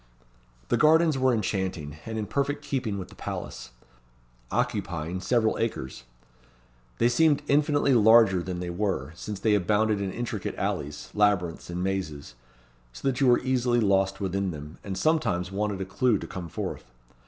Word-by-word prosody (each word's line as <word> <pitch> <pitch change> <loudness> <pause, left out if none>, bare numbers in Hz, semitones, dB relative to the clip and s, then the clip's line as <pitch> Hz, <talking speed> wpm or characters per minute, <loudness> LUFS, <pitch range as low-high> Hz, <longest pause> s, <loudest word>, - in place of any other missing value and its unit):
The - - +3
gardens 160 0 +5
were 130 -1 +3
enchanting, 95 -9 -2
and 110 0 -4
in 110 - -2
perfect 140 +4 -1
keeping 130 -8 -2
with 95 -2 -6
the - - -15
palace. - - -6 0.8
Occupying 90 +2 -2
several 110 +1 +1
acres. 65 - -3 0.9
They 120 - +3
seemed 150 +3 +3
infinitely 145 -1 +3
larger 110 -4 +6
than 90 0 -4
they 90 -1 -4
were, 85 -7 -2
since 105 +3 -6
they 110 0 +2
abounded 105 +1 +2
in 95 -1 -2
intricate 115 -3 -4
alleys, 75 +1 -3
labyrinths, 100 -6 +1
and 90 +1 -3
mazes; 85 -9 -3 0.6
so - - -5
that 135 0 0
you 135 - +5
were 120 - +5
easily 125 -2 +1
lost 95 -2 +2
within 95 0 -1
them, 75 -1 -8
and 95 -2 -5
sometimes 115 - +1
wanted 100 0 -2
a - - -2
clue 110 +4 +2
to - - -7
come 90 -3 -7
forth. - - -5
105 Hz, 160 wpm, -27 LUFS, 90-120 Hz, 0.9 s, larger